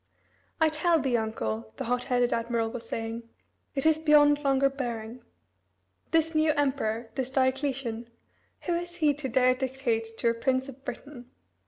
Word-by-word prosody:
"I 320 -1 +5
tell 325 +2 +2
thee, 265 -4 0
uncle," 110 - -3
the - - -3
hot 245 +1 -1
headed 245 -2 +2
admiral 230 -1 -1
was 230 -1 -8
saying, 230 +1 -4 0.5
"it 270 - -1
is 315 -1 +4
beyond 295 -1 +5
longer 275 0 +3
bearing. 240 -3 -5 0.9
This 325 0 +2
new 310 0 +3
emperor 240 -6 -1
this 265 -2 -3
Diocletian 260 -3 -1 0.5
who 350 - -1
is 345 +1 -3
he 305 -4 +3
to 280 -2 -5
dare 255 +1 +4
to 260 +1 -2
dictate 230 -4 -2
to 235 - +2
a - - +2
prince 260 +3 0
of 270 0 -11
Britain? 250 -1 -8
260 Hz, 165 wpm, -28 LUFS, 230-290 Hz, 0.9 s, I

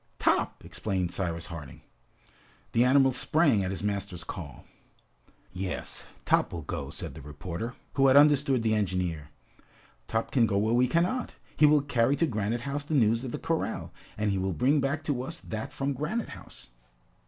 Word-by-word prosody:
"Top!" - - +1
exclaimed 95 -4 -2
Cyrus 85 -2 -2
Harding. 80 -7 -9 0.9
The 115 - +4
animal 135 +1 +5
sprang 130 - +2
at 90 - -2
his 95 +1 -4
master's 100 -4 -3
call. 80 -7 -8 0.9
"Yes, 90 0 -4 0.2
Top - - +3
will 85 -2 -5
go," - - -4
said - - -6
the - - -10
reporter, 85 - -6 0.2
who 135 -1 +4
had 135 +1 +6
understood 145 -4 +5
the 110 -1 +2
engineer. 90 -7 -1 0.8
"Top 115 0 -1
can 120 -4 +4
go 100 -2 0
where 110 +3 +2
we 125 +1 +4
cannot! 175 - 0 0.2
He 150 - +6
will 150 0 +5
carry 135 -1 +2
to 165 - +2
Granite 110 -3 -1
House 140 +3 -3
the 155 +1 -2
news 115 -2 +3
of 130 - -4
the - - -3
corral, - - -2 0.2
and 105 -1 +1
he 95 - 0
will 95 0 -1
bring 140 +4 +3
back 140 +3 -1
to 145 -5 -1
us 165 +6 -5
that 110 0 -5
from 140 +1 -2
Granite 160 - -2
House!" - - -11
115 Hz, 175 wpm, -28 LUFS, 95-140 Hz, 0.9 s, had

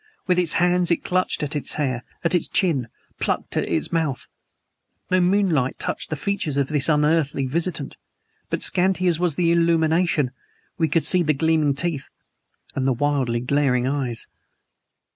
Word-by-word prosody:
With 180 -1 +2
its 170 -3 +2
hands 180 0 +2
it 170 - 0
clutched 185 -3 0
at 150 +1 -4
its 145 - -2
hair 130 -5 -2 0.2
at 170 - +1
its 175 - +1
chin; 155 - +1 0.3
plucked - - -2
at - - 0
its - - -1
mouth. 160 -6 -1 0.9
No 185 - +4
moonlight 175 -8 +1
touched - - -4
the 155 - -2
features 155 -3 -2
of 140 -2 0
this 150 -1 +3
unearthly 150 -2 +1
visitant, 160 +1 -3 0.5
but - - -1
scanty 185 0 +2
as 170 -3 +2
was 175 -4 0
the 170 0 +2
illumination 165 -3 +2 0.5
we 160 - +2
could 165 +2 +1
see 185 - +5
the 155 -3 +1
gleaming 155 -1 +1
teeth 160 -2 -3 0.6
and 135 -1 -1
the 135 - +3
wildly 130 -3 0
glaring 130 -1 +1
eyes. 130 -4 -2
155 Hz, 160 wpm, -22 LUFS, 140-175 Hz, 0.9 s, see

